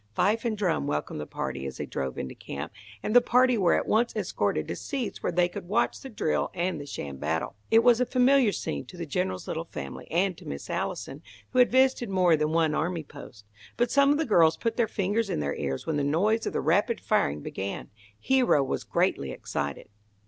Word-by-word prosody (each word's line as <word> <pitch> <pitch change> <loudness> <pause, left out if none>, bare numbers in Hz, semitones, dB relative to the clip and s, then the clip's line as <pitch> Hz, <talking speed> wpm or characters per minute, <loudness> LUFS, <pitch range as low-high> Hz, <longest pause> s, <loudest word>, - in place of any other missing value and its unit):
Fife 225 +4 +2
and 220 -2 0
drum 175 - 0
welcomed 75 0 -2
the 75 - -6
party 70 +1 -4
as 65 - -7
they - - -3
drove 65 -1 -4
into 65 - -4
camp, 70 +3 -7 0.3
and 215 - -1
the 245 - +9
party 250 +1 +4
were 185 -6 +3
at - - 0
once 230 +3 +2
escorted - - -1
to - - -3
seats 270 -6 -4
where - - -1
they 175 +1 +3
could 175 0 -8
watch 220 +5 +1
the 270 - -8
drill 205 -9 -1
and 175 -3 -1
the 145 - -9
sham 70 - -6
battle. 80 +4 -2 0.2
It 225 +1 +5
was 245 0 +5
a 250 - +2
familiar 255 -2 +4
scene - - -3
to 180 - -12
the 170 - -4
General's 145 - -2
little - - -3
family, 70 -1 -7
and 180 +2 +1
to - - -12
Miss 70 0 -6
Allison, 135 +3 -3 0.3
who 255 - +1
had 250 - +6
visited 260 -2 +3
more 180 -3 +4
than 150 0 0
one 160 -1 +2
army 165 +1 -1
post. 130 -7 -13 0.3
But 240 0 +1
some 280 0 +5
of 290 - +3
the 320 - 0
girls 165 - +4
put 230 -1 -1
their 235 -2 +2
fingers 205 +1 -1
in - - -1
their 70 -1 -1
ears 70 -2 -3
when 160 -2 -1
the 145 - 0
noise 200 +10 +1
of - - -3
the - - 0
rapid 200 - +2
firing 75 - +1
began. 95 +5 -5 0.3
Hero 250 - +3
was 135 - -3
greatly 70 - 0
excited. - - -4
180 Hz, 220 wpm, -27 LUFS, 140-235 Hz, 0.3 s, the